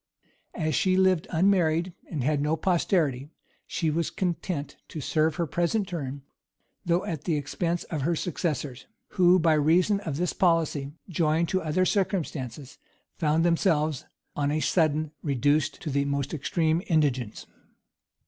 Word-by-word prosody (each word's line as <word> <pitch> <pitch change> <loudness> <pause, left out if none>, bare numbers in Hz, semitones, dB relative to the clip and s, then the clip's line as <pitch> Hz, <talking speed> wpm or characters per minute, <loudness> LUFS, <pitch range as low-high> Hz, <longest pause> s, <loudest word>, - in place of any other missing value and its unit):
As 155 -2 -1
she 185 +6 +2
lived 185 -3 +3
unmarried, 175 -1 +2 0.2
and 150 -7 -3
had 145 +1 +1
no 150 +2 +1
posterity, 160 -6 +1 0.4
she 160 -3 -1
was 165 +1 0
content 175 -4 -3
to 155 - -7
serve 155 +2 +1
her 170 - 0
present 175 +6 0
turn, 140 -6 -5 0.6
though 175 +1 +1
at 155 -3 -5
the 165 - +1
expense 165 +4 -2
of 155 -4 -4
her 170 +5 +1
successors; 150 -6 -3 0.2
who, 180 -2 +5
by 165 -2 +3
reason 170 +7 +3
of 160 -8 -4
this 175 +1 -1
policy, 160 -6 +1 0.2
joined 165 -1 +1
to 185 - 0
other 165 +4 +1
circumstances, 150 - -2 0.4
found 160 +1 +2
themselves 160 -4 +1 0.3
on 145 -1 0
a 150 +1 0
sudden 155 -2 +1
reduced 145 +2 +1
to 155 - -3
the 140 +1 +1
most 140 +1 -2
extreme 160 +2 0
indigence. 135 - 0
160 Hz, 145 wpm, -27 LUFS, 145-175 Hz, 0.6 s, who